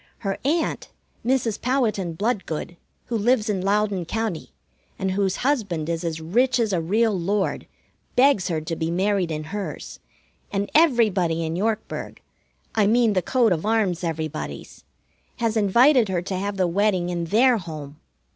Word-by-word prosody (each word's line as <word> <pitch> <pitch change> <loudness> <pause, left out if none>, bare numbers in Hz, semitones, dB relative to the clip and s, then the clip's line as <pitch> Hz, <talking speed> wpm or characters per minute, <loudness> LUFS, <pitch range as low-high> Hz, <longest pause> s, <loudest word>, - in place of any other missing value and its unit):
Her 195 -1 -1
aunt, 315 +5 -1 0.3
Mrs. 240 -4 0
Powhatan 225 -9 0
Bloodgood, 190 -4 -2 0.3
who 235 - -3
lives 220 0 +2
in 190 -3 -2
Loudon 200 -1 +1
County, 220 -3 -3 0.5
and 190 0 -1
whose 195 0 0
husband 200 - 0
is 165 0 -2
as 165 -2 -3
rich 245 +10 +1
as 220 -4 +1
a 175 - +1
real 215 +6 +2
lord, 195 +2 -1 0.5
begs 250 -7 +4
her 165 -4 -1
to 160 +2 -4
be 160 0 -2
married 190 0 +1
in 155 -1 -3
hers; 195 +5 -6 0.5
and 200 0 -2
everybody 205 - +3
in 160 +1 -3
Yorkburg 220 +3 -3 0.5
I 210 -2 +3
mean 230 0 +3
the 185 - +2
coat 240 +1 +2
of 160 -3 0
arms 205 -5 +1
everybodies 160 -2 -5 0.5
has 230 -2 -1
invited 235 +3 +4
her 180 -2 -1
to 190 - -3
have 200 +2 -3
the 185 - +2
wedding 185 0 +1
in 170 -1 -2
their 235 +7 +4
home. 155 -4 -8
200 Hz, 155 wpm, -23 LUFS, 175-225 Hz, 0.5 s, begs